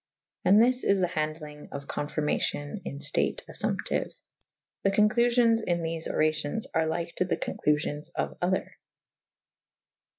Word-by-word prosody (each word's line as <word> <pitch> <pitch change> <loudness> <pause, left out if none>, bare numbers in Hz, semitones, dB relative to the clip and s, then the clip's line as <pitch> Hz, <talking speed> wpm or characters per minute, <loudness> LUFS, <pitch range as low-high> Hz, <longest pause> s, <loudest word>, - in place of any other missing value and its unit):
And 200 +3 +6
this 250 +2 +3
is 200 -1 +3
the 185 - +3
handelynge 155 -3 -4
of 140 0 -6
confyrmacyon 145 +3 -2
in 140 - -5
ftate - - 0
affumptiue. - - 0 0.7
The - - +4
conclufions 230 +3 +4
in 175 -3 0
thefe 165 0 -1
oracyons 155 +6 0
are 160 0 +2
lyke 165 +1 -2
to 185 - +2
the 185 - -1
conclufions 150 +1 -1
of - - -2
other. 185 +1 -1
165 Hz, 130 wpm, -28 LUFS, 150-200 Hz, 0.7 s, And